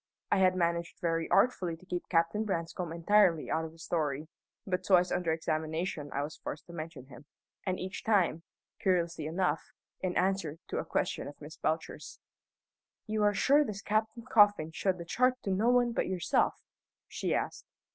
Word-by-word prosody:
I -, -, +4 dB
had 185 Hz, -1 st, +4 dB
managed 170 Hz, -1 st, -1 dB
very 165 Hz, -1 st, 0 dB
artfully 185 Hz, -9 st, +3 dB
to 185 Hz, -, -19 dB
keep 180 Hz, -1 st, -4 dB
Captain 165 Hz, +5 st, +2 dB
Branscome 170 Hz, -3 st, -3 dB
entirely 170 Hz, -1 st, +3 dB
out 160 Hz, 0 st, 0 dB
of 160 Hz, -, -7 dB
the 165 Hz, -, -18 dB
story, 155 Hz, -3 st, -2 dB, 0.4 s
but 185 Hz, -1 st, -1 dB
twice 180 Hz, -2 st, +4 dB
under 170 Hz, -2 st, 0 dB
examination 160 Hz, -1 st, -2 dB
I 140 Hz, -, -1 dB
was 150 Hz, +1 st, -6 dB
forced 150 Hz, -, -6 dB
to 170 Hz, -, -12 dB
mention 155 Hz, -5 st, -7 dB
him 130 Hz, +1 st, -14 dB, 0.4 s
and 185 Hz, 0 st, 0 dB
each 185 Hz, +2 st, -5 dB
time, 190 Hz, -7 st, +2 dB, 0.4 s
curiously 170 Hz, -6 st, 0 dB
enough, 165 Hz, -2 st, -1 dB, 0.3 s
in 185 Hz, -1 st, -2 dB
answer 185 Hz, -5 st, 0 dB
to 460 Hz, -, -1 dB
a -, -, -3 dB
question -, -, -1 dB
of -, -, -10 dB
Miss -, -, -10 dB
Belcher's. -, -, -3 dB, 0.9 s
"You 215 Hz, -1 st, -1 dB
are 205 Hz, 0 st, +3 dB
sure 290 Hz, +2 st, +5 dB
this 200 Hz, -7 st, -6 dB
Captain 220 Hz, +2 st, -1 dB
Coffin 205 Hz, -7 st, +4 dB
showed 185 Hz, +3 st, 0 dB
the 170 Hz, -, -7 dB
chart 255 Hz, +8 st, +2 dB
to 195 Hz, -, -1 dB
no 210 Hz, +5 st, +2 dB
one 245 Hz, -1 st, +4 dB
but -, -, -1 dB
yourself?" 185 Hz, -2 st, +1 dB, 0.4 s
she -, -, -1 dB
asked. -, -, -3 dB
180 Hz, 175 wpm, -31 LUFS, 165-205 Hz, 0.9 s, sure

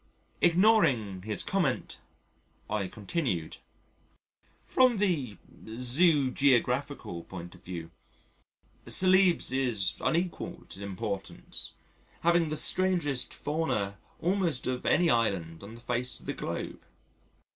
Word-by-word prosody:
Ignoring 165 Hz, -, +4 dB
his 105 Hz, +1 st, -3 dB
comment, 175 Hz, -10 st, -1 dB, 0.7 s
I 105 Hz, -3 st, -1 dB
continued: 105 Hz, -, -3 dB, 1.1 s
"From 255 Hz, -3 st, +4 dB
the 160 Hz, -, 0 dB, 0.3 s
Zoogeographical 130 Hz, -, +1 dB
point 90 Hz, -2 st, -8 dB
of -, -, -17 dB
view, 85 Hz, -2 st, -7 dB, 1.0 s
Celebes 185 Hz, -5 st, +5 dB
is 125 Hz, -7 st, +1 dB
unequalled 170 Hz, +2 st, -2 dB
in 100 Hz, -, -11 dB
importance, 100 Hz, 0 st, -5 dB, 0.5 s
having 170 Hz, -1 st, +3 dB
the 155 Hz, -, -1 dB
strangest 170 Hz, -6 st, +1 dB
fauna 105 Hz, -11 st, -2 dB, 0.2 s
almost 175 Hz, -6 st, 0 dB
of 130 Hz, 0 st, -2 dB
any 175 Hz, -1 st, +4 dB
island 95 Hz, -9 st, 0 dB
on 105 Hz, +3 st, -10 dB
the -, -, -12 dB
face 120 Hz, +1 st, -2 dB
of -, -, -17 dB
the -, -, -2 dB
globe. -, -, -5 dB
130 Hz, 105 wpm, -29 LUFS, -, 1.1 s, Celebes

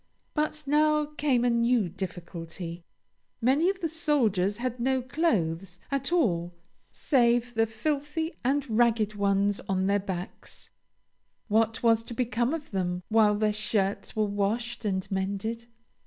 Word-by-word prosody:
But 305 Hz, 0 st, -1 dB
now 300 Hz, +1 st, +3 dB
came 290 Hz, -5 st, +1 dB
a -, -, +4 dB
new 235 Hz, -3 st, +2 dB
difficulty. 170 Hz, -1 st, -7 dB, 0.6 s
Many 275 Hz, +9 st, +3 dB
of 390 Hz, 0 st, -3 dB
the 335 Hz, -, +1 dB
soldiers 245 Hz, -, +1 dB
had 250 Hz, 0 st, -3 dB
no 260 Hz, +2 st, +2 dB
clothes 195 Hz, -, -1 dB
at 275 Hz, +2 st, -1 dB
all 175 Hz, -, +1 dB, 0.4 s
save 240 Hz, -3 st, +2 dB
the 225 Hz, -1 st, +2 dB
filthy 295 Hz, +8 st, -2 dB
and 275 Hz, +3 st, +1 dB
ragged 225 Hz, -2 st, +2 dB
ones 200 Hz, 0 st, +1 dB
on 190 Hz, -1 st, +1 dB
their 200 Hz, +1 st, +2 dB
backs; 190 Hz, -2 st, -6 dB, 0.8 s
what 225 Hz, +2 st, +2 dB
was 225 Hz, -1 st, +4 dB
to 230 Hz, +1 st, -8 dB
become 240 Hz, 0 st, 0 dB
of 320 Hz, -2 st, -5 dB
them 180 Hz, -2 st, -2 dB
while 215 Hz, -2 st, +4 dB
their 210 Hz, 0 st, +1 dB
shirts 205 Hz, -2 st, -1 dB
were 215 Hz, -1 st, +2 dB
washed 220 Hz, +4 st, -2 dB
and 190 Hz, -2 st, 0 dB
mended? 200 Hz, +5 st, -2 dB
225 Hz, 140 wpm, -28 LUFS, 195-265 Hz, 0.8 s, a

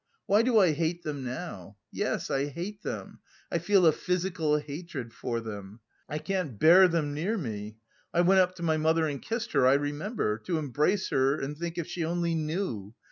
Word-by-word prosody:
Why 205 Hz, +2 st, +4 dB
do 235 Hz, -1 st, +3 dB
I 185 Hz, -6 st, +6 dB
hate 165 Hz, +3 st, -1 dB
them 145 Hz, -4 st, -4 dB
now? 120 Hz, -, -6 dB
Yes, -, -, -2 dB
I 135 Hz, +1 st, +1 dB
hate 175 Hz, +8 st, -6 dB
them, -, -, -6 dB, 0.3 s
I 170 Hz, -, +1 dB
feel 185 Hz, +2 st, +4 dB
a 160 Hz, -, +7 dB
physical 175 Hz, -2 st, 0 dB
hatred 145 Hz, -5 st, -6 dB
for 120 Hz, -2 st, -3 dB
them, 105 Hz, -1 st, -8 dB, 0.3 s
I 150 Hz, -, -2 dB
can't 180 Hz, -, -3 dB
bear 175 Hz, -, +8 dB
them 160 Hz, -4 st, -1 dB
near 180 Hz, +10 st, -1 dB
me.... 110 Hz, -, -5 dB, 0.3 s
I 175 Hz, -, +3 dB
went 190 Hz, +2 st, +5 dB
up 185 Hz, 0 st, +3 dB
to 170 Hz, -, -8 dB
my 160 Hz, -1 st, +2 dB
mother 160 Hz, +1 st, +2 dB
and 145 Hz, -3 st, -3 dB
kissed 230 Hz, +1 st, -3 dB
her, 130 Hz, -, +4 dB
I 130 Hz, -, +6 dB
remember.... 145 Hz, -, -1 dB
To 170 Hz, +7 st, -2 dB
embrace 150 Hz, +6 st, 0 dB
her 135 Hz, +2 st, +2 dB
and 140 Hz, +2 st, -4 dB
think 170 Hz, +2 st, -5 dB
if 170 Hz, -, -2 dB
she 170 Hz, -, -4 dB
only 170 Hz, +1 st, 0 dB
knew... 155 Hz, -, -3 dB
160 Hz, 195 wpm, -28 LUFS, 135-180 Hz, 0.3 s, bear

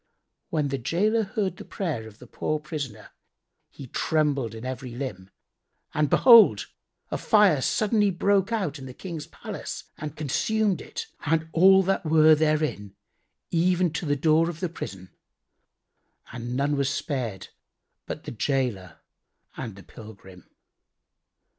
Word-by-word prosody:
When 150 Hz, -3 st, 0 dB
the 135 Hz, 0 st, -2 dB
gaoler 205 Hz, -, +1 dB
heard 200 Hz, -3 st, -2 dB
the -, -, -8 dB
prayer 150 Hz, -, -4 dB
of 110 Hz, -1 st, -14 dB
the 125 Hz, -, -13 dB
poor 155 Hz, +5 st, -2 dB
prisoner 145 Hz, -8 st, -7 dB, 0.6 s
he 140 Hz, -, -11 dB
trembled 140 Hz, -3 st, 0 dB
in 110 Hz, +2 st, -8 dB
every 130 Hz, 0 st, -5 dB
limb, 120 Hz, -8 st, -6 dB, 0.6 s
and 150 Hz, -1 st, +1 dB
behold, 230 Hz, -3 st, +7 dB, 0.5 s
a -, -, -2 dB
fire 205 Hz, -, +4 dB
suddenly 210 Hz, -, +2 dB
broke 195 Hz, +2 st, +1 dB
out 185 Hz, -10 st, -2 dB
in 135 Hz, -, -8 dB
the 130 Hz, -, -10 dB
King's 165 Hz, -5 st, -7 dB
palace -, -, -7 dB, 0.2 s
and 150 Hz, 0 st, -6 dB
consumed 200 Hz, +7 st, 0 dB
it -, -, -6 dB, 0.2 s
and 160 Hz, +1 st, +1 dB
all 190 Hz, +3 st, +6 dB
that 195 Hz, +1 st, 0 dB
were 155 Hz, -1 st, +6 dB
therein, 150 Hz, -10 st, 0 dB, 0.6 s
even 175 Hz, 0 st, +2 dB
to 165 Hz, 0 st, -3 dB
the 145 Hz, -, +2 dB
door 160 Hz, +3 st, +3 dB
of 165 Hz, -2 st, -7 dB
the 180 Hz, -, -2 dB
prison,[FN#88] 95 Hz, -, -8 dB, 1.2 s
and 120 Hz, 0 st, -5 dB
none 145 Hz, +1 st, +1 dB
was 140 Hz, -1 st, +1 dB
spared 120 Hz, -12 st, -3 dB, 0.6 s
but -, -, -6 dB
the -, -, -7 dB
gaoler 115 Hz, -, -2 dB, 0.5 s
and 115 Hz, -6 st, -6 dB
the 100 Hz, -, -13 dB
pilgrim. 100 Hz, -5 st, -14 dB
150 Hz, 140 wpm, -26 LUFS, 125-180 Hz, 1.2 s, behold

